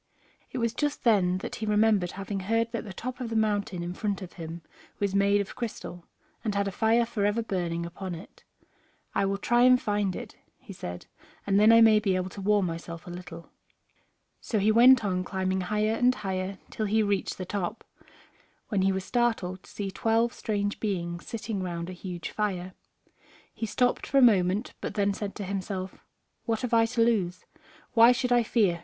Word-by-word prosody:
It - - -5
was 230 -2 0
just 290 +2 -2
then 185 -6 +3 0.2
he 220 - -3
remembered 210 -4 +3
having 195 +1 -4
heard 225 +4 0
that 230 - -3
the 205 - -7
top 245 +7 -6
of 245 -3 -4
the 225 - -4
mountain 205 -5 0
in 175 +1 -4
front 200 0 -2
of 180 - -10
him 165 -1 -8 0.3
was 200 -1 -1
made 200 +1 +3
of 200 - -7
crystal, 215 -7 -6 0.4
and 215 -3 -1
had 200 0 +1
a - - -2
fire 225 +4 +2
forever 215 0 0
burning 170 -5 -2
upon 175 +1 -6
it. 165 - -13 0.7
"I 195 - +1
will 195 0 0
try 240 +4 +2
and 250 0 +6
find 205 -4 -1
it," - - -8 0.2
he - - -11
said, 90 0 -7 0.4
"and 200 0 +3
then 215 +2 +7
I 230 0 +7
may 220 -1 +7
be 200 -3 +1
able 185 0 -1
to 200 - -8
warm 205 0 +3
myself 170 0 -6
a 175 - -8
little." 175 -1 -9 0.9
So 220 - -2
he 210 +2 +3
went 240 +1 +7
on 185 -2 0
climbing 190 0 -1
higher 210 +3 0
and 250 +2 +3
higher 190 -2 -3
till 215 - -2
he 220 +2 +2
reached 200 -1 -1
the 185 - -5
top, 200 +2 -3 0.9
when 205 -4 +1
he 195 +1 +3
was 190 0 -3
startled 225 -7 0
to - - -18
see 200 -2 -4
twelve 225 +3 +1
strange 205 -1 -2
beings 175 -5 -3
sitting 225 -3 -4
round 175 -1 -4
a - - -7
huge 180 -1 -6
fire. 185 -3 -2 0.8
He 225 - -4
stopped 245 +4 +1
for 275 - +1
a - - +7
moment, 200 -1 +3
but - - -4
then 200 -1 +2
said 200 0 -5
to 205 - -5
himself, 190 -1 -4 0.4
"What 225 -1 -1
have 250 -2 -3
I 225 0 +5
to 230 0 +2
lose? 190 -6 0 0.5
Why 230 0 +8
should 250 0 0
I 240 0 +5
fear? 210 -7 +1
200 Hz, 200 wpm, -28 LUFS, 185-225 Hz, 0.9 s, Why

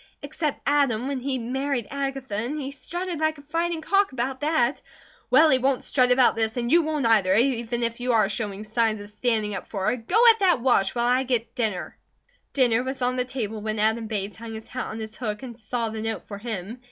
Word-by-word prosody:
"Except 300 0 -3
Adam, 270 -5 +2
when 275 -1 -2
he 260 +1 -2
married 255 0 -2
Agatha; 270 -4 -4
and 240 +9 -2
he 275 -1 -4
strutted 345 +4 -5
like 315 0 0
a 285 - -13
fighting 330 +2 -2
cock 395 +3 +2
about 260 +2 -3
that." 290 -4 +1 0.5
"Well, 315 0 +6
he 260 - +4
won't 265 0 +1
'strut' 250 -2 +3
about 250 0 +5
this, 220 +1 -1
and 240 0 -1
you 340 +2 +6
won't 305 -4 -1
either, 205 -5 +4
even 240 0 +1
if 235 0 -1
you 250 +1 0
are 215 -3 +4
showing 205 -1 -4
signs 220 0 0
of 205 0 -9
standing 215 -1 -1
up 190 - -5
for 195 -3 -3
her. - - +1
Go 300 - 0
at 450 - -3
that 370 -8 +3
wash, 235 -6 +2
while 240 0 +1
I 250 +2 +3
get 240 -3 -1
dinner." 215 -7 -2 0.6
Dinner 245 -4 +3
was 260 0 -4
on 250 +1 +1
the 250 -1 0
table 225 -5 -4
when 215 0 -3
Adam 220 +1 +1
Bates 205 -2 -3
hung 225 0 -7
his 220 - -8
hat 255 - -5
on 220 - -6
its 220 0 -7
hook 215 -1 -4
and 245 -3 -7
saw 230 0 -3
the 220 0 -5
note 225 0 -3
for 200 -1 -7
him. 220 0 -5
245 Hz, 225 wpm, -25 LUFS, 220-275 Hz, 0.6 s, Well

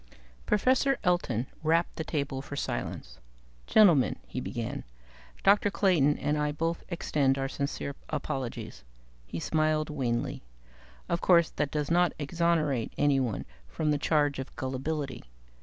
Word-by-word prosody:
Professor 260 +4 +3
Elton 140 - +1 0.2
rapped 165 +2 +1
the 160 - -3
table 140 -4 -2
for 145 - -7
silence. 140 - -4 0.5
"Gentlemen," 175 -12 +5
he 130 - -5
began, 120 -2 -4 0.6
"Dr. 205 +1 +5
Clayton 170 -8 +3
and 150 +1 0
I 150 0 +1
both 165 +3 -2
extend 140 -6 +1
our 135 0 -1
sincere 140 +1 -3 0.2
apologies." 135 - -4 0.4
He 85 - -5
smiled 155 - +1
wanly. 125 -5 -2 0.7
"Of 170 - -1
course, 170 -3 +5
that 150 -2 -1
does 150 +1 -2
not 175 0 +3
exonerate 155 -5 0
anyone 135 -7 +1 0.2
from 150 - -1
the 145 - +1
charge 145 -3 +2
of 135 - -7
gullibility. 135 0 -3
150 Hz, 130 wpm, -29 LUFS, 135-165 Hz, 0.7 s, Gentlemen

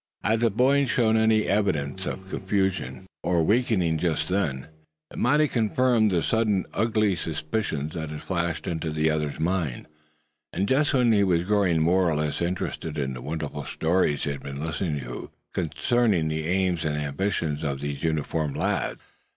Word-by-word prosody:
Had 110 +2 +2
the 115 0 +3
boy 135 +6 +3
shown 115 -3 +2
any 110 -1 +4
evidences 95 -4 0
of 95 0 -5
confusion 95 -5 -1 0.2
or 85 -2 +2
weakening 95 -5 +2
just 85 0 0
then, 75 -9 -1 0.5
it - - -7
might 145 +5 +3
have 155 -1 +3
confirmed 115 -1 +2
the 90 -4 +1
sudden 110 -4 +1
ugly 110 -3 +2
suspicions 80 -2 -3
that 80 -3 -4
had 75 0 -7
flashed 85 -2 -2
into 80 -1 -2
the 80 +1 +1
other's 75 -2 -2
mind, 80 -6 -1 0.7
and 95 +3 -1
just 145 +4 +2
when 125 -3 +4
he 105 -2 +4
was 85 -3 +2
growing 95 -5 +2
more 90 +2 +3
or 80 - 0
less 75 +1 -1
interested 85 -2 -3
in 65 -2 -1
the - - -7
wonderful 75 0 -4
stories 80 -3 +1
he 75 - -1
had 70 - -5
been 70 +2 -5
listening 80 -1 -2
to 60 -1 -7 0.2
concerning 95 0 +1
the 80 0 -2
aims 90 -1 +1
and 75 -1 -1
ambitions 75 +1 -1
of 70 -3 -2
these 70 -1 -4
uniformed 80 -1 -1
lads. - - -1
85 Hz, 170 wpm, -26 LUFS, 75-105 Hz, 0.7 s, any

